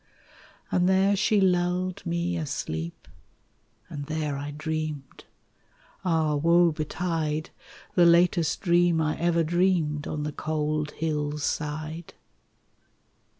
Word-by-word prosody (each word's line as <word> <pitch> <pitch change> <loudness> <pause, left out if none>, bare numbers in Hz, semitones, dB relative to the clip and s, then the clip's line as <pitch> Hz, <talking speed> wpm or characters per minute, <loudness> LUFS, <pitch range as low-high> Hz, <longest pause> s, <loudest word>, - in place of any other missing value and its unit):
And 180 0 +3
there 190 +1 +4
she 210 +1 +2
lulled 180 -1 +1
me 170 +1 -1
asleep, 85 - -4 0.8
And 145 -1 -7
there 155 -2 -2
I 145 +1 -5
dreamed 155 -2 -5 0.8
Ah! 160 -4 +1
woe 170 +3 +4
betide! 155 0 -2 0.4
The 175 -2 +5
latest 170 -2 +3
dream 175 -2 +3
I 155 -1 0
ever 170 0 +2
dreamed 165 -3 +1
On 150 -1 -3
the 150 - -3
cold 155 0 -2
hill's 150 -2 -2
side. 155 +3 -4
160 Hz, 110 wpm, -26 LUFS, 150-175 Hz, 0.8 s, The